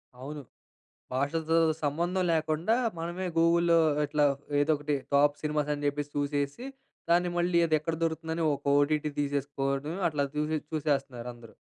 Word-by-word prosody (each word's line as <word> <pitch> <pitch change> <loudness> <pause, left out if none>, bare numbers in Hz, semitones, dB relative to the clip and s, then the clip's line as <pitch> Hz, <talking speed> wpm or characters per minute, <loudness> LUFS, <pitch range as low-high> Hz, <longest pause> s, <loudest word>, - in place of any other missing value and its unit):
అవును. 145 +4 -7 0.7
భాషతో 160 +5 0 0.3
సంబంధం 170 +6 0
లేకుండా, 160 +6 +1 0.2
మనమే 175 +3 -3
గూగుల్‌లో 170 0 +4 0.3
ఇట్లా 150 0 +2 0.3
ఏదో 150 +2 +3
ఒకటి 145 0 -1 0.2
టాప్ 145 +1 +4
సినిమాస్ 150 -1 -1
అని 145 0 -5
చెప్పేసి 145 0 -2
చూసేసి, 145 - -2 0.5
దాన్ని 175 +1 +3
మళ్ళీ 175 0 +2
అది 155 - +2
ఎక్కడ 160 +1 -2
దొరుకుతుందని 160 0 -2
ఒక 140 - -14
ఓటీటీ 150 +1 +1
తీసేసుకోవడం. 140 +1 -2
అట్లా 145 -2 -1
చూసి 155 +1 0
చూసేస్తున్నారు 140 -5 -1
అందరూ. 120 -2 -15
150 Hz, 135 wpm, -29 LUFS, 145-165 Hz, 0.7 s, గూగుల్‌లో